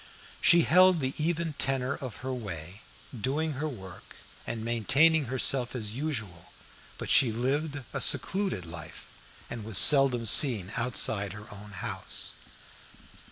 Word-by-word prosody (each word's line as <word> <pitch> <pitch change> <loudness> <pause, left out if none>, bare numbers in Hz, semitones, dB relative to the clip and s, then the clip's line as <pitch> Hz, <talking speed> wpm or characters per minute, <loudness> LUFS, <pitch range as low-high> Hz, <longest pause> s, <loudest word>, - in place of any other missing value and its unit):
She 170 0 +5
held 185 +1 +4
the 130 -1 -3
even 165 -1 -2
tenor 135 0 -1
of 130 -6 -8
her 130 - -3
way, 95 -4 -8 0.3
doing 140 +8 -2
her 145 +2 -4
work 95 -9 -12 0.3
and 115 -1 -5
maintaining 140 +7 +2
herself 130 0 0
as 110 -4 -5
usual, 110 - -6 0.5
but - - -5
she 120 - +5
lived 140 +5 -3
a - - -4
secluded 190 - +1
life, 80 -2 -11 0.4
and 115 -2 -8
was 110 -2 -1
seldom 135 -5 +6
seen 105 -5 +5
outside 110 -5 -1
her 105 0 -11
own 105 +1 -12
house. 95 - -6
125 Hz, 135 wpm, -27 LUFS, 105-145 Hz, 0.5 s, seldom